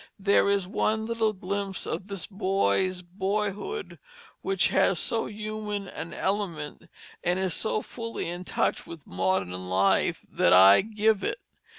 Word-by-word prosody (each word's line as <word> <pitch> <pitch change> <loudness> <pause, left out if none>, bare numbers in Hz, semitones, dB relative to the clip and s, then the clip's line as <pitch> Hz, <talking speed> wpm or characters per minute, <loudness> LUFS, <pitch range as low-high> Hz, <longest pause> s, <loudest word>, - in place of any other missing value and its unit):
There 200 0 +3
is 200 -2 +1
one 220 +3 0
little 225 -1 +1
glimpse 195 0 -4
of 180 +4 -4
this 195 -4 -3
boy's 185 - 0
boyhood 205 - -3 0.4
which 195 -1 +2
has 190 -1 +3
so 225 +7 0
human 210 -1 -4
an 170 -2 -7
element, 185 -7 -3 0.3
is 180 0 +1
so 215 +3 -1
fully 230 -1 -5
in 175 +1 -5
touch - - -1
with 165 -4 -9
modern 95 0 0 0.2
life, 95 +1 +2
that - - +3
I 95 +2 +8
give 215 0 +1
it. - - -1
195 Hz, 135 wpm, -27 LUFS, 175-210 Hz, 0.4 s, I